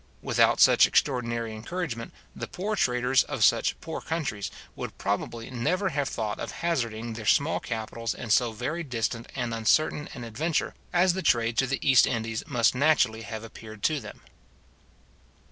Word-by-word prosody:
Without - - +3
such - - +7
extraordinary 115 -4 0
encouragement, 120 0 -5 0.2
the - - -5
poor 210 +4 -3
traders 125 -4 +2
of - - -2
such - - +3
poor 160 - -5
countries 145 -11 -3 0.3
would - - -6
probably 115 +4 -3
never 180 +11 0
have 145 -3 -1
thought 105 -3 -3
of - - -4
hazarding 115 -9 -2
their 110 -1 -7
small 145 +3 +3
capitals 115 0 -4
in 115 - -5
so 120 +1 +4
very 130 +10 -3
distant 120 -4 -3
and 120 -3 -2
uncertain 145 +6 +1
an 120 - -7
adventure 150 +9 -1 0.2
as 175 +1 +4
the 190 - -3
trade 115 -7 +2
to 135 - +2
the 140 +2 -2
East 130 -2 +6
Indies 115 -2 -2
must 120 -6 +3
naturally 125 -5 +2
have 110 -1 -6
appeared 110 -2 -11
to 155 -2 +2
them. - - -11
120 Hz, 160 wpm, -27 LUFS, 115-150 Hz, 0.3 s, such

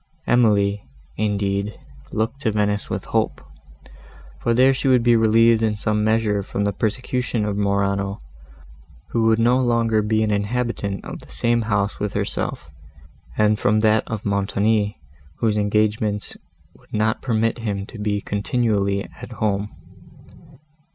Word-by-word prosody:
Emily, 105 -4 +3 0.3
indeed, 100 -1 -1 0.3
looked 110 +6 -2
to 115 - +1
Venice 105 -1 0
with - - -3
hope, - - 0 1.0
for 115 - +1
there 130 +2 +5
she 135 +1 -2
would 125 -3 +4
be 120 0 +5
relieved 115 0 +4
in 110 -1 +1
some 105 +1 0
measure 110 -2 +1
from 100 +1 -3
the 100 0 0
persecution 120 +1 -1
of 105 -1 -2
Morano, 100 0 0 0.9
who 115 -1 +1
would 110 0 +4
no 120 +3 +3
longer 115 -3 +2
be 110 +1 +1
an 105 - 0
inhabitant 100 -1 -2
of - - -7
the - - -13
same 120 0 +1
house 100 -2 -1
with 105 -1 -2
herself, - - -3 0.7
and 105 0 +3
from 105 +1 +2
that 110 0 +3
of 110 -2 -5
Montoni, 100 0 0 0.4
whose 110 -2 0
engagements 105 0 0 0.4
would - - -24
not 110 +1 0
permit 115 -1 0
him 100 -3 -3
to 110 - -11
be 105 -1 -1
continually 100 -2 0
at - - -11
home. 105 -1 -1
105 Hz, 145 wpm, -22 LUFS, 100-115 Hz, 1.0 s, there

